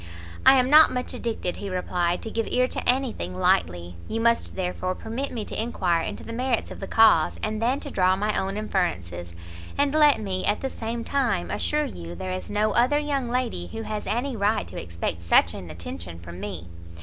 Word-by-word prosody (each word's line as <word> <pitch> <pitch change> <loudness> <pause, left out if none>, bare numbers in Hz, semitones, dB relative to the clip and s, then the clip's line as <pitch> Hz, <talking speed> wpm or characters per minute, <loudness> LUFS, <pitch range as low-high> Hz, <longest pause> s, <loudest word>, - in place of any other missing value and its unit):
"I 270 - +10
am 255 -1 +4
not 305 +3 +8
much 250 0 -3
addicted," 220 -6 -3
he 200 - -5
replied, 180 -1 -1
"to 225 - -5
give 225 0 -1
ear 250 0 +2
to - - -2
any 260 -1 +2
thing 90 +1 -5
lightly; 85 -1 +1
you 225 - -2
must 230 0 +1
therefore 185 0 -2
permit 240 +8 -4
me 220 -4 -4
to - - -3
enquire 180 -7 0
into - - -5
the 230 - -7
merits 250 0 -1
of - - -8
the 195 - -5
cause, 225 -1 +4
and 215 0 -2
then 250 +4 +1
to - - -6
draw 185 0 +3
my 210 +2 -1
own 195 +1 -1
inferences. 90 - -2 0.4
And 285 0 +2
let 300 -2 +5
me, 190 -3 -3
at 205 - 0
the 270 - -2
same 230 +1 -4
time, 235 -11 0
assure 300 0 0
you 85 - -7
there 90 +2 -5
is 90 0 -5
no 210 +1 +1
other 250 +5 +3
young 280 -4 -1
lady 240 - -2
who 225 - -6
has 215 -1 -4
any 240 +6 -1
right 210 +1 +1
to - - -6
expect 85 0 -4
such 85 - +4
an 90 - -8
attention 85 +1 -7
from 85 +1 -10
me. 85 -2 -6
215 Hz, 210 wpm, -25 LUFS, -, 0.4 s, I